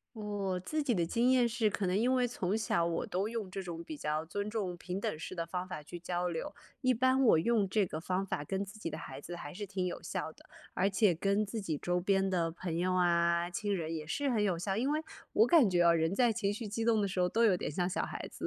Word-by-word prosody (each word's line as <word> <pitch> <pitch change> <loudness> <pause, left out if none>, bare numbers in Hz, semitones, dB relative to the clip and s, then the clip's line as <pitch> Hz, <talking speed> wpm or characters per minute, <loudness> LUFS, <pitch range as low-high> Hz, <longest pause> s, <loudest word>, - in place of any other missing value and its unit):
我 205 -4 -2
自 305 - -2
己 265 -5 +1
的 170 -4 +1
经 235 +8 +2
验 250 -2 +4
是， 225 -2 +1
可 195 -1 -1
能 180 +1 +1
因 240 +5 +2
为 250 -1 +2
从 195 -4 -1
小 170 -6 +1
我 170 0 -1
都 195 +4 -1
用 225 -5 -4
这 195 +1 -4
种 170 -2 -6
比 160 -2 -7
较 150 +2 -2
尊 205 +4 -3
重 200 -5 -2
平 180 +2 -5
等 155 - -2
式 170 - -6
的 170 -2 -3
方 180 +2 -3
法 180 -4 -6
去 175 +4 -8
交 175 +1 -2
流， 165 -2 -4 0.3
一 255 -1 +4
般 260 +2 +3
我 220 - +6
用 215 +4 +2
这 195 +1 +1
个 155 - -5
方 185 +4 -1
法 145 -6 -3
跟 190 +6 -2
自 200 +2 -8
己 170 - -4
的 155 - -5
孩 135 -2 -8
子 175 - -7
还 145 -4 -7
是 205 +3 -5
挺 190 -1 -2
有 180 - -4
效 - - -3
的。 - - -18 0.3
而 195 +2 +2
且 195 -2 +3
跟 200 +5 +1
自 215 +2 -4
己 160 -6 -2
周 180 +3 0
边 195 +1 +2
的 170 -3 +1
朋 170 0 -4
友 180 +2 +1
啊、 170 -1 +3
亲 200 +3 -2
人 165 -3 -3
也 155 -1 -5
是 285 - -1
很 230 -5 +2
有 185 -4 +1
效。 195 +3 -1
因 255 +6 +1
为 305 +1 +1 0.3
我 - - +5
感 305 - +6
觉， 175 -1 +2
啊， 170 -1 +6
人 165 +2 +1
在 240 +2 +4
情 210 -3 0
绪 215 +1 -5
激 225 +3 -2
动 225 -2 +3
的 200 - +1
时 190 - -4
候 180 - +4
都 225 +6 +2
有 200 -5 +5
点 - - -3
像 175 +4 0
小 185 - -1
孩 - - -6
子， - - -5
190 Hz, 295 characters per minute, -32 LUFS, 170-215 Hz, 0.3 s, 我